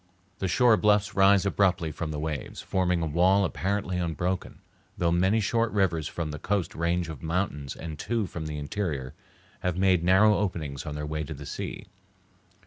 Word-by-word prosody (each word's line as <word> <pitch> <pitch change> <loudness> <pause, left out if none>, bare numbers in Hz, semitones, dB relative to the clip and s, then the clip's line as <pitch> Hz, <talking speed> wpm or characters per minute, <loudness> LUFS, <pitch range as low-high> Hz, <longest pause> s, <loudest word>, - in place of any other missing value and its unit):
The 95 - -1
shore 115 +5 +4
bluffs 105 0 +2
rise 100 -1 +5
abruptly 90 -5 +1
from 80 +1 -4
the 75 - -4
waves, 75 -3 -4
forming 90 -2 0
a - - 0
wall 90 +6 +3
apparently 95 +3 -2
unbroken, 85 +2 -2 0.4
though 85 -1 +1
many 95 +6 +3
short 115 +2 +1
rivers 85 -6 +1
from 80 -3 -4
the 75 - -6
coast 100 0 -1
range 85 +1 0
of 80 -5 -8
mountains 80 -5 -2
and 80 -2 -7
two 115 -3 -1
from 80 -3 -6
the 75 -1 -4
interior 75 -4 -3 0.5
have 90 -1 -2
made 95 -3 +3
narrow 95 +4 +5
openings 80 -9 -3
on 75 - -4
their 75 0 -4
way 75 +1 -3
to 80 +1 -6
the 70 +1 -9
sea. - - -5
90 Hz, 180 wpm, -27 LUFS, 75-100 Hz, 0.5 s, rise